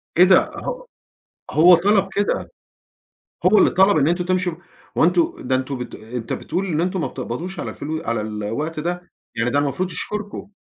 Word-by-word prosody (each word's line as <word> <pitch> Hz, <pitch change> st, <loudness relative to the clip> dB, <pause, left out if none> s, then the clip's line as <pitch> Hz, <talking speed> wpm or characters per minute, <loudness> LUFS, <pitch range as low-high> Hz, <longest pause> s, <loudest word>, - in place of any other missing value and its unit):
كده 180 Hz, +2 st, +7 dB
ه -, -, -6 dB, 0.7 s
هو 175 Hz, +4 st, +7 dB
طلب 195 Hz, +3 st, +3 dB
كده، 205 Hz, +1 st, -1 dB, 1.0 s
هو 200 Hz, +4 st, +6 dB
اللي -, -, +6 dB
طلب 190 Hz, 0 st, +4 dB
إن 145 Hz, -1 st, +3 dB
أنتم 175 Hz, +1 st, 0 dB
تمشوا 185 Hz, -1 st, 0 dB, 0.4 s
هو -, -, +4 dB
أنتم 175 Hz, 0 st, +3 dB
ده 130 Hz, -, +2 dB
أنتم 130 Hz, +1 st, -2 dB
بت 125 Hz, 0 st, -7 dB
أنت 115 Hz, +1 st, -6 dB
بتقول 185 Hz, +3 st, -3 dB
إن 165 Hz, -4 st, -1 dB
أنتم 180 Hz, +1 st, -1 dB
ما -, -, -1 dB
بتقبضوش 165 Hz, +9 st, -6 dB
على -, -, -4 dB
الفلو 155 Hz, +2 st, -5 dB
على 115 Hz, -2 st, -1 dB
الوقت 110 Hz, +9 st, -4 dB
ده، 175 Hz, +2 st, -4 dB, 0.3 s
يعني 115 Hz, +2 st, +1 dB
ده 140 Hz, -, +2 dB
المفروض 160 Hz, +6 st, -1 dB
يشكركم. 205 Hz, +4 st, -5 dB
170 Hz, 175 wpm, -21 LUFS, 135-185 Hz, 1.0 s, كده